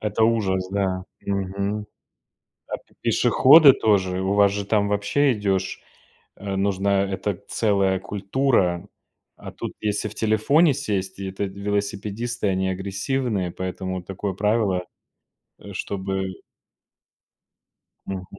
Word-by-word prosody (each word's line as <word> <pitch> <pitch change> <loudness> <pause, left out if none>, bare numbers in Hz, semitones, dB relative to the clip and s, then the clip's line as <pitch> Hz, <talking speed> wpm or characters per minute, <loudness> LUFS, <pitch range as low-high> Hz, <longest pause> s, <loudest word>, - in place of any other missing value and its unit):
Это 105 +1 +1
ужас, 95 -5 +1
да. 95 -2 -1 0.2
Мгм. 100 +1 -2 0.8
А - - -2
п - - -29
пешеходы 145 +1 +7
тоже, 95 -5 +1
у 95 +1 0
вас 100 -1 +5
же, 100 0 -3
там, 100 -1 +2
вообще, 115 +7 +2
идешь, 95 -2 -1 0.6
а, 100 -1 -4
нужна 100 0 +1
это 100 0 -3
целая 100 -3 +1
культура. 100 -1 0 0.5
А - - -9
тут, - - -6
если 105 0 -1
в 105 - -11
телефоне 135 +9 +3
сесть, 100 -8 -3
и 95 - -4
это 95 +2 -3
велосипедисты, 100 +3 -3
они 95 0 0
агрессивные, 100 +1 -2
поэтому 95 0 -4
такое 95 +2 -4
правило, 105 -3 +1 0.7
э - - -10
чтобы 95 -2 -3 1.7
Мгм. 95 -1 -4
100 Hz, 120 wpm, -23 LUFS, 95-105 Hz, 1.7 s, пешеходы